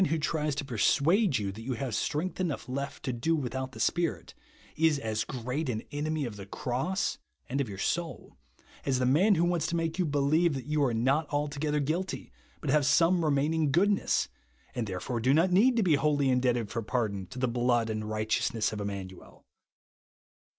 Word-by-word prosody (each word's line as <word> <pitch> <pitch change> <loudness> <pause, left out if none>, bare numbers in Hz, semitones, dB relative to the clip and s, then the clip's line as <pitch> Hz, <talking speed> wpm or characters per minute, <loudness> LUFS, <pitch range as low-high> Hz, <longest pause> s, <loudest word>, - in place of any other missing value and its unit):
wlio 165 -2 +1
tries 150 -1 -1
to 145 - -3
persuade 145 - +3
you 100 -3 -2
that 105 +3 -9
you 130 +3 -3
havo 125 0 -4
strength 155 - -2
enough 165 -9 -2
left 140 +2 -4
to 130 - -2
do 140 +8 +1
without 130 -2 -3
the - - -10
Spirit, 175 -2 -1 0.4
is 160 -1 +3
as 110 -4 -2
great 130 +4 -3
an 110 -3 -2
enemy 150 0 -2
of 110 -4 -6
the 100 - -8
cross, 145 - -2 0.3
and 135 +3 -1
of 130 - -3
your 100 - -7
soul, 170 - -3 0.5
as 135 -2 +1
the 125 - +1
man 180 +11 +4
who 165 - +2
wants 175 -2 0
to 170 - -2
make 165 +1 -2
you - - +4
believe 145 +3 +2
that 130 - -5
you 150 0 +1
are 130 - +2
not 135 +7 +1
alto 145 0 -2
gether 150 0 0
guilty, 165 +7 -2 0.3
but 145 - -1
have 150 0 +4
some 165 +4 +4
remaining 150 +1 +1
goodness, 195 +6 +2 0.5
and 120 -3 -2
therefore 100 +6 -3
do 130 +5 +3
not 175 +4 +3
need 235 +7 +4
to 225 - +3
be 175 -5 +3
wholly 145 -2 +2
indebted 125 -3 +1
for 115 0 -2
pardon 105 -4 -2
to 130 - -11
the 130 0 +1
blood 120 -1 +1
and 110 -1 -3
righteousness 110 +1 0
of 105 - -4
Immanuel. 95 -2 -7
140 Hz, 195 wpm, -29 LUFS, 120-160 Hz, 0.5 s, man